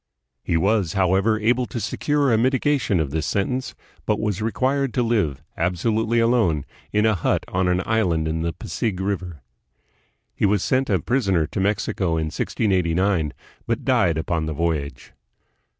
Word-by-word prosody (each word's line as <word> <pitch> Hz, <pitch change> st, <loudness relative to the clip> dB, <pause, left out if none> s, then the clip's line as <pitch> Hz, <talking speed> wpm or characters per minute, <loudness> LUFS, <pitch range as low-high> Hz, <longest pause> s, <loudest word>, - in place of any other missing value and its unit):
217 -, -, -3 dB
He 85 Hz, -, +4 dB
was, 95 Hz, -1 st, +1 dB
however, 95 Hz, +3 st, +2 dB
able 120 Hz, +3 st, +1 dB
to 120 Hz, -, -5 dB
secure 145 Hz, +2 st, 0 dB
a -, -, +4 dB
mitigation 130 Hz, -, +1 dB
of 75 Hz, -4 st, -1 dB
this 80 Hz, +1 st, -2 dB
sentence, 125 Hz, +6 st, -2 dB, 0.3 s
but 105 Hz, -, +1 dB
was 105 Hz, -2 st, -1 dB
required 130 Hz, +4 st, 0 dB
to 125 Hz, -, +2 dB
live 105 Hz, -, 0 dB
absolutely 110 Hz, +7 st, +1 dB
alone 115 Hz, -, +2 dB, 0.3 s
in 105 Hz, +1 st, +2 dB
a 110 Hz, -, +4 dB
hut 90 Hz, -, 0 dB
on 90 Hz, 0 st, 0 dB
an 90 Hz, +1 st, +1 dB
island 90 Hz, -8 st, +1 dB
in 80 Hz, +1 st, -2 dB
the 85 Hz, 0 st, -1 dB
Pasig 95 Hz, +4 st, -3 dB
River. 90 Hz, -7 st, -3 dB, 0.9 s
He -, -, +1 dB
was 100 Hz, -1 st, +1 dB
sent 130 Hz, +1 st, +1 dB
a 95 Hz, -, +3 dB
prisoner 95 Hz, -, +1 dB
to -, -, -5 dB
Mexico 100 Hz, -1 st, 0 dB
hi 80 Hz, -, 0 dB
1689, 90 Hz, 0 st, 0 dB, 0.4 s
but -, -, -2 dB
died 85 Hz, -3 st, +2 dB
upon 80 Hz, 0 st, -1 dB
the 80 Hz, -, -2 dB
voyage. 75 Hz, -5 st, -3 dB
100 Hz, 165 wpm, -23 LUFS, 85-115 Hz, 0.9 s, He